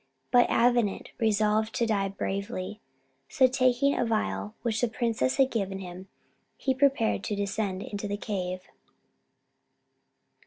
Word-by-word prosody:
But 245 -1 +5
Avenant 240 -4 +2
resolved 215 0 +2
to 235 - +2
die 205 -3 +1
bravely; 195 +1 -4 0.5
so, 260 - +4
taking 255 +1 +3
a - - +1
phial 105 - -1
which 225 -2 0
the 245 - +3
princess 225 - 0
had 265 -1 +3
given 195 -4 -2
him, 185 0 -8 0.5
he 265 - 0
prepared 260 -6 +2
to 210 - -1
descend 200 -1 -2
into 205 0 -5
the 205 0 -2
cave. 185 -3 -3
215 Hz, 130 wpm, -28 LUFS, 195-240 Hz, 0.5 s, But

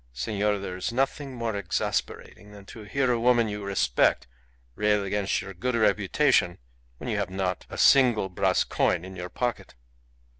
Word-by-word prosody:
Senor, 105 - -1
there 95 -2 -6
is 95 - -3
nothing 135 +2 -2
more 115 -3 -3
exasperating 105 0 -3
than 100 -1 -13
to 110 - -11
hear 125 +5 0
a 120 - +1
woman 120 -1 +3
you 105 -1 -5
respect 95 -11 +1 0.5
rail 105 +5 +1
against 100 0 -1
your 100 0 -8
good 120 +7 -2
reputation 105 -3 +2 0.4
when - - -8
you 105 - -1
have 100 -2 -2
not 95 -1 -3
a - - -8
single 125 -7 +5
brass 90 - +1
coin 90 0 0
in 95 0 -10
your 90 0 -6
pocket. 120 +4 -4
105 Hz, 165 wpm, -26 LUFS, 95-120 Hz, 0.5 s, single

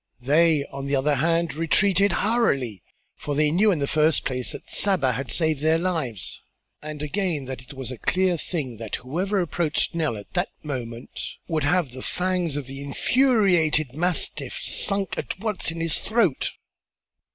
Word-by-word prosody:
They, 150 +1 +4
on 140 0 -5
the 140 - +1
other 140 +2 +2
hand, 165 +4 +1
retreated 190 +5 +3
hurriedly 140 - +1 0.4
for 145 - -4
they 150 0 +3
knew 200 +6 +4
in 180 - +1
the 140 - 0
first 155 +1 +2
place 125 -1 -1
that - - -8
Saba 180 -10 +3
had 125 +1 -4
saved 160 -2 +2
their 160 +1 +3
lives 145 - -3 0.4
and 150 -1 -6
again 165 -3 -1
that 130 -1 -6
it 125 +3 -13
was 130 -1 -6
a 125 - -8
clear 185 -1 +2
thing 150 -8 -3
that 110 -1 -4
whoever 180 +11 -2
approached 170 -3 0
Nell 155 -9 -1
at 100 - -12
that 180 +1 0
moment 120 -5 -6
would 155 -4 0
have 170 -3 +1
the 130 +1 -8
fangs 180 -3 -1
of 145 - -4
the 135 +2 -7
infuriated 170 - +2
mastiff 180 - +1
sunk 200 - 0
at - - -4
once 210 -4 0
in 165 0 -4
his 165 -1 0
throat. 215 - +1
155 Hz, 170 wpm, -24 LUFS, 135-180 Hz, 0.4 s, They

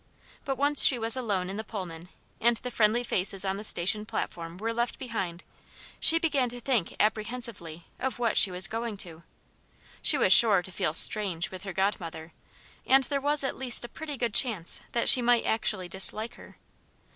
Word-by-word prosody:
But 270 -1 -3
once 285 +1 +3
she 260 - +5
was 225 0 +2
alone 205 -8 -3
in 195 +2 -7
the 220 - -5
Pullman, 180 -6 -9 0.3
and 235 0 +2
the 250 - -7
friendly 225 +2 +1
faces 195 -3 0
on 190 0 -2
the 210 - -8
station 210 +1 0
platform 175 -6 -6
were 225 +4 -4
left 235 +1 -3
behind, 190 -9 -6 0.6
she 325 - +7
began 290 -7 0
to 245 +1 -8
think 240 -7 -2
apprehensively 215 -6 -3
of 265 - -3
what 235 -3 -1
she 200 - +5
was 180 0 +2
going 225 +1 -5
to. 170 -4 -4 0.8
She 300 - +4
was 195 -7 +5
sure 205 -6 +6
to 185 - -8
feel 155 -3 -2
"strange" 185 -4 +1
with 185 -1 -9
her 195 - -6
godmother, 170 -4 -4 0.5
and 270 +1 +3
there 280 +1 -2
was 290 +1 +1
at 265 - -3
least 250 -2 +3
a - - -10
pretty 305 -3 -8
good 235 -3 -3
chance 210 -10 +1
that 235 - -1
she 255 - +8
might 240 -1 +2
actually 210 -4 0
dislike 200 +6 -2
her. - - -16
220 Hz, 190 wpm, -27 LUFS, 185-245 Hz, 0.8 s, she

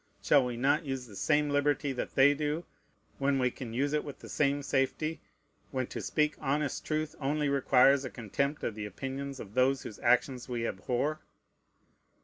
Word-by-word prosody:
Shall 140 -2 +5
we 125 -1 -3
not 140 +6 +2
use 135 -3 -4
the 105 -4 -13
same 150 +5 +2
liberty 145 -1 +1
that 125 - -5
they 140 +2 +6
do, 150 +3 -2 0.5
when 140 0 +2
we 125 -1 +2
can 120 -2 -7
use 140 +5 0
it 150 - +1
with 145 - -8
the - - -12
same 145 -1 +1
safety, 140 +4 -1 0.5
when 130 -2 -1
to - - -6
speak 150 -1 +1
honest 145 +1 -1
truth 155 0 -2
only 145 +1 0
requires 135 0 +4
a 130 - -4
contempt 140 +7 -2
of 115 - -1
the 105 -1 -5
opinions 135 +6 -5
of 100 -1 -9
those 130 +2 +2
whose 105 - -8
actions 125 +1 +2
we 120 -2 -2
abhor? 125 +10 -1
135 Hz, 180 wpm, -30 LUFS, 125-145 Hz, 0.5 s, they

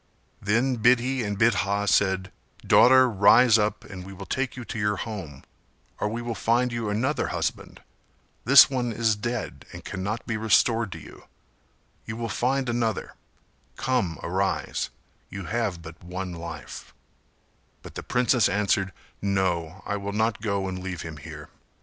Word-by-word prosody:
Then 120 +5 +1
Bidhi 125 +3 +3
and 105 -1 -3
Bidha 100 -2 +1
said 95 +1 +2 0.3
"Daughter, 130 +1 +6
rise 110 +2 +5
up 105 0 -1
and 95 -2 -9
we 95 +1 -10
will 95 - -9
take 135 -1 -2
you 125 - -6
to 115 - -5
your 105 0 +1
home, 95 - -7 0.6
or 105 - 0
we 120 +2 -4
will 120 -1 -3
find 120 +2 +1
you 115 -2 -3
another 125 +8 0
husband; - - -4 0.6
this 135 +3 +9
one 125 -3 -2
is 110 -1 +1
dead 120 +4 -4
and - - -10
cannot 100 +4 -4
be 115 - -2
restored 110 0 +2
to - - -8
you; - - -13 0.8
you 110 0 -5
will 115 -1 -3
find 130 +7 0
another; 115 -2 -1 0.6
come 115 -11 -1
arise, 95 +3 -1 0.4
you 95 -1 -7
have 105 -7 -2
but 80 +1 -12
one 90 +1 -5
life," 85 -7 -9 0.9
But - - -11
the - - -6
princess 125 -3 +2
answered 100 -1 0 0.3
"No 95 -3 -1
I 100 - -2
will 100 0 -5
not 110 +1 0
go 100 -3 -1
and 95 -1 -5
leave 90 -3 -5
him 80 -2 -8
here. 75 0 -10
105 Hz, 155 wpm, -25 LUFS, 95-120 Hz, 0.9 s, this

